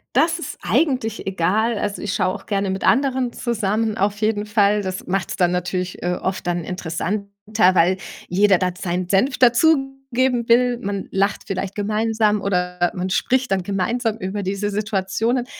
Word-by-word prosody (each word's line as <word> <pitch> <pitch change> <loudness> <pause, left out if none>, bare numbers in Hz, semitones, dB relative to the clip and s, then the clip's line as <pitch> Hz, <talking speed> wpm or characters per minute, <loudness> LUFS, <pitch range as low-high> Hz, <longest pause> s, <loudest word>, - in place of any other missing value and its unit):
Das 320 +5 +3
ist - - -6
eigentlich 255 -8 0
egal. 200 +5 +1
Also, 205 0 -3
ich 205 -1 -2
schaue 185 0 +1
auch - - -10
gerne 200 -2 -1
mit 190 0 -3
anderen 260 -2 +2
zusammen 220 -2 -1
auf 205 +1 0
jeden 215 -1 0
Fall. 210 -1 +2
Das 185 -1 -5
macht's 190 0 -2
dann 180 -1 +2
natürlich, 180 +1 -3
äh, 180 0 0
oft 190 +1 -3
dann 175 -1 -1
interessanter, 185 +4 -3 0.5
weil 180 +2 +4 0.3
jeder 195 +1 +4
dann 180 -1 -1
seinen 180 -1 -3
Senf 230 +8 +2
dazugeben 265 -2 +2
will. 245 +1 +4
Man 200 -1 -3
lacht 200 +2 0
vielleicht 195 +1 -4
gemeinsam 215 0 +1
oder 180 -2 0
man 185 +1 -2
spricht 255 +4 +1
dann 190 -1 +1
gemeinsam 210 +5 -1
über 200 0 -4
diese 200 +2 -2
Situationen. 215 +4 -1
205 Hz, 160 wpm, -21 LUFS, 185-235 Hz, 0.5 s, weil